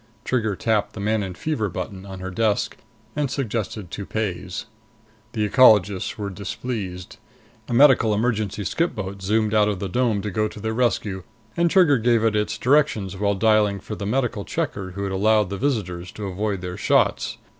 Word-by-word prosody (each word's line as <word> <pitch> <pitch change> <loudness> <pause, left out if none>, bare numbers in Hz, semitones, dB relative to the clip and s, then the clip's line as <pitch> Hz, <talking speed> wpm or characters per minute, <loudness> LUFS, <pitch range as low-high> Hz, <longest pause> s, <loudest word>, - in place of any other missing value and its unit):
Trigger 110 -5 0
tapped 110 0 0
the - - -8
"Manon 100 -3 -1
Fever" 110 - -2
button 95 +2 -6
on 95 -1 -8
her 95 0 -5
desk, 105 +1 0 0.4
and 145 -2 0
suggested 110 - -3
toupees. 100 -3 -4 0.7
The 105 -2 0
ecologists 105 -6 +4
were 100 -2 -4
displeased. 100 -2 -5 0.5
A - - -2
medical 130 -4 +6
emergency 105 -2 0
skip 165 - -1
boat 100 -1 -5
zoomed 110 +2 +1
out 105 -1 +4
of 100 - -1
the 100 - -4
dome 110 0 0
to 105 - -3
go 110 +3 0
to 105 - -10
their 110 +2 -2
rescue; 110 -5 0 0.3
and 170 0 +2
Trigger 160 -8 +5
gave 115 0 +2
it 110 -1 +2
its 105 0 0
directions 125 -8 +2
while 100 +1 0
dialing 105 -1 +3
for 105 - -8
the 100 -1 -4
medical 120 -3 -1
checker 95 -1 -3
who'd 100 +1 -3
allowed 105 +1 +2
the 100 - -3
visitors 95 -10 -2
to 105 - -6
avoid 100 0 -2
their 90 0 -5
shots. - - +1
105 Hz, 175 wpm, -23 LUFS, 95-115 Hz, 0.7 s, medical